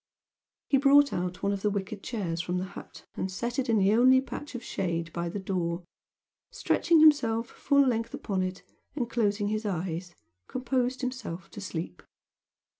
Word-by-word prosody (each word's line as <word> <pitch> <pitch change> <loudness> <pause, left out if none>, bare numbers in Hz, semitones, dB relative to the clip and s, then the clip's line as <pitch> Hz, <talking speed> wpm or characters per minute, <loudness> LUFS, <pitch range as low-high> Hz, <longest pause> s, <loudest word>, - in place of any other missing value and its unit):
He 275 - +4
brought 280 +1 +5
out 180 +1 -3
one 200 - +2
of 200 - -4
the 210 - +2
wicker 200 +1 -3
chairs 195 -5 -3
from 180 +1 -2
the 180 - -2
hut 190 - -11
and 190 - -3
set 235 +7 -3
it 265 -2 -1
in 225 - +4
the 200 +1 +4
only 255 +3 +6
patch 270 +1 -7
of 245 - -5
shade 170 -5 -3
by 170 0 -2
the 185 - -4
door, 180 -3 -2 0.7
stretching 330 -2 +2
himself 235 -7 +5
full 280 -1 +3
length 230 -2 -1
upon 195 -2 -2
it, 185 +1 -3 0.3
and 250 -5 -1
closing 205 -3 0
his 215 +1 -1
eyes, 175 -2 -3 0.3
composed 255 0 -1
himself 235 -10 -5
to 205 - -8
sleep. 165 - -5
205 Hz, 175 wpm, -28 LUFS, 185-250 Hz, 0.7 s, only